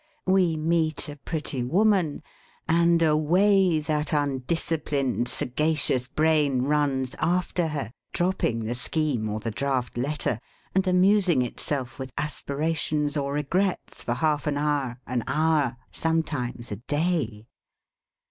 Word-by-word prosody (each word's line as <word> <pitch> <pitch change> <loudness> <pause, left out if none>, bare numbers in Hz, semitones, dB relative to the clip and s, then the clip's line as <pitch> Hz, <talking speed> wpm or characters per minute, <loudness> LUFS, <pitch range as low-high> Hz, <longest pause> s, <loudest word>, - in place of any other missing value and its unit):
We 185 -4 +3
meet 160 -1 0
a 145 - -7
pretty 150 -2 -3
woman, 185 - +2 0.4
and 170 0 +4
away 175 +3 +4
that 150 0 -1
undisciplined, 140 -2 0
sagacious 130 0 0
brain 150 -3 +2
runs 140 -3 0
after 175 0 +1
her, 145 -6 -4 0.2
dropping 175 -10 0
the 110 +2 -2
scheme 125 -3 0
or 105 +1 -2
the 115 +1 -3
draft 130 0 -2
letter, 140 -4 -1 0.3
and 190 0 +2
amusing 185 -5 +4
itself 130 +1 -3
with 130 -1 -6
aspirations 150 0 -1
or 140 -1 -1
regrets 180 +7 -1
for 120 - -2
half 150 +1 0
an 145 -1 0
hour, 145 -4 -1
an 120 -2 -2
hour, 150 -3 +1
sometimes 145 -8 -2
a 105 - -3
day. 145 - -1
150 Hz, 120 wpm, -26 LUFS, 130-165 Hz, 0.4 s, and